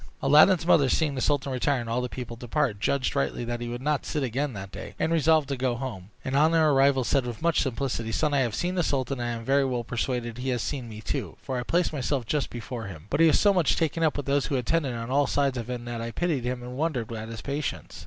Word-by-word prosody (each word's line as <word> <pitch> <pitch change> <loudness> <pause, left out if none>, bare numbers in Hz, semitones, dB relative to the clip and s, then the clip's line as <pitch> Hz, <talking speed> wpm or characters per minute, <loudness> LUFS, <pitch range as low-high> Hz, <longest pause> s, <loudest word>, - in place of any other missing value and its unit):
Aladdin's 155 +5 +6
mother, 145 -6 +5
seeing 155 0 +1
the 130 - -3
sultan 140 -1 +1
retire, 130 +1 +1
and 120 - -5
all 115 +2 0
the 125 - -3
people 120 -2 -6
depart, 120 -2 -1
judged 135 +4 0
rightly 70 - -1
that 120 0 -3
he 120 - -3
would 120 +2 -5
not 150 -1 0
sit 150 - -2
again 130 +3 -1
that 95 -2 -7
day, - - -8
and 165 - 0
resolved 160 -2 +3
to 140 - 0
go 125 -1 0
home; 115 -7 -6 0.2
and 130 0 -1
on 155 +3 +4
her 160 -2 +4
arrival 135 -1 +4
said, 135 +2 +1
with 120 +4 -6
much 170 -2 +3
simplicity, 125 -3 -2
"Son, 150 +5 0
I 140 - +3
have 120 -5 0
seen 180 +1 -1
the 185 - +1
sultan, 135 -4 -1
and 120 -1 -3
am - - -11
very 140 +2 +3
well 125 -3 -1
persuaded 120 0 -3
he 130 +1 -2
has 125 -3 0
seen 130 -5 -4
me 110 0 -8
too, - - -4
for 130 -2 -3
I - - -1
placed 170 +6 0
myself 135 -2 -1
just 145 +4 -1
before 120 -1 -6
him; 80 -6 -9
but - - +1
he 165 - +7
was 155 - +4
so 205 -1 +5
much 175 -7 +3
taken 165 0 0
up 160 -2 +2
with 145 - -3
those 140 0 +1
who 140 - -1
attended 135 +1 0
on 115 +1 -5
all 140 +1 +3
sides 140 -2 +1
of 120 -1 -5
him, 120 -1 -4
that 120 -1 -4
I 115 - -3
pitied 150 -1 -1
him 125 0 -2
and 125 +1 -7
wondered 130 -7 -1
at 110 0 -6
his 115 -1 -7
patience. 145 0 -4
130 Hz, 270 wpm, -27 LUFS, 120-145 Hz, 0.2 s, he